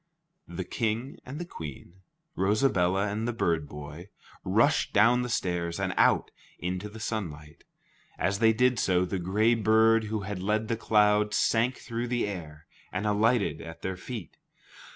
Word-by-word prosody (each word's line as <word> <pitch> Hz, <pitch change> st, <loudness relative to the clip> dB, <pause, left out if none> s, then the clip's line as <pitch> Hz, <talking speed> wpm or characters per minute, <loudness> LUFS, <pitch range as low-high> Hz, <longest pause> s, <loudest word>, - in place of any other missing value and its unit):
The 85 Hz, +2 st, -5 dB
King 115 Hz, +6 st, -3 dB
and 135 Hz, +3 st, -6 dB
the 175 Hz, -, -5 dB
Queen, 85 Hz, -, -9 dB, 0.3 s
Rosabella 95 Hz, -2 st, +2 dB
and 105 Hz, +3 st, -2 dB
the 120 Hz, -, -1 dB
bird 80 Hz, -9 st, 0 dB
boy, 75 Hz, +5 st, -9 dB, 0.3 s
rushed -, -, +2 dB
down 115 Hz, +4 st, +5 dB
the 125 Hz, -, -3 dB
stairs 85 Hz, -5 st, -1 dB
and 95 Hz, -2 st, -1 dB
out -, -, +3 dB, 0.3 s
into 90 Hz, +3 st, -4 dB
the 110 Hz, +2 st, -11 dB
sunlight. 80 Hz, -10 st, -5 dB, 0.5 s
As 100 Hz, +1 st, 0 dB
they 110 Hz, -1 st, +5 dB
did 125 Hz, +2 st, +2 dB
so, 90 Hz, -1 st, +2 dB
the 95 Hz, +1 st, -3 dB
gray 105 Hz, +6 st, +2 dB
bird 110 Hz, 0 st, +4 dB
who 110 Hz, 0 st, -3 dB
had 95 Hz, -1 st, -5 dB
led 105 Hz, +3 st, 0 dB
the 115 Hz, -, +1 dB
cloud, 105 Hz, -1 st, +3 dB
sank 120 Hz, +3 st, +2 dB
through 120 Hz, 0 st, -4 dB
the 120 Hz, 0 st, 0 dB
air 80 Hz, -6 st, -7 dB, 0.3 s
and 95 Hz, +3 st, -3 dB
alighted 105 Hz, +2 st, +2 dB
at 80 Hz, 0 st, -10 dB
their 95 Hz, 0 st, -2 dB
feet. 110 Hz, +1 st, -8 dB
105 Hz, 160 wpm, -28 LUFS, 90-115 Hz, 0.5 s, down